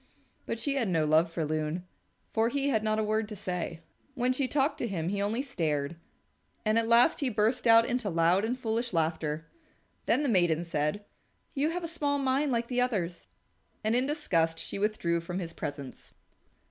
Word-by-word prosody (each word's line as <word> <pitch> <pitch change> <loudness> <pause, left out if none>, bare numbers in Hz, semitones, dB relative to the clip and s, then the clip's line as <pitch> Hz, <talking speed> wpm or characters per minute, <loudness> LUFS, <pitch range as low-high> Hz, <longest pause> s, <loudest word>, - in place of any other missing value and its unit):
But 230 - -2
she 275 +5 -1
had 235 -5 +1
no 165 -3 +2
love 160 +2 +4
for 165 -1 -2
Loon, 155 +3 -2 0.5
for 225 +1 +2
he 280 +2 0
had 220 -5 +1
not 215 0 +1
a 220 - +1
word 215 0 0
to 215 - -6
say. 175 -3 -4 0.3
When 250 0 +1
she 260 0 0
talked 280 +2 +1
to 235 - -1
him 175 -5 -2
he 200 +1 -1
only 220 +6 0
stared, 155 - -2 0.7
and 215 +1 +3
at 225 - -1
last 235 +6 +5
he 275 - +1
burst 225 +3 +1
out 230 0 +7
into 245 -4 -1
loud 170 +3 +3
and 240 +3 -1
foolish 230 -2 -2
laughter. 160 -1 -1 0.6
Then 295 - +3
the - - +1
maiden 175 -7 +2
said, 160 +5 -1 0.5
"You 290 +1 +1
have 350 +1 -3
a - - -2
small 290 -3 -1
mind 275 +1 +1
like 235 -1 0
the 250 0 0
others," 185 -9 -2 0.6
and 220 +2 +2
in 255 +2 +2
disgust 165 - 0
she 200 - -5
withdrew 200 -5 0
from 175 +2 -5
his 170 -3 -4
presence. 140 -2 -7
215 Hz, 195 wpm, -29 LUFS, 170-250 Hz, 0.7 s, out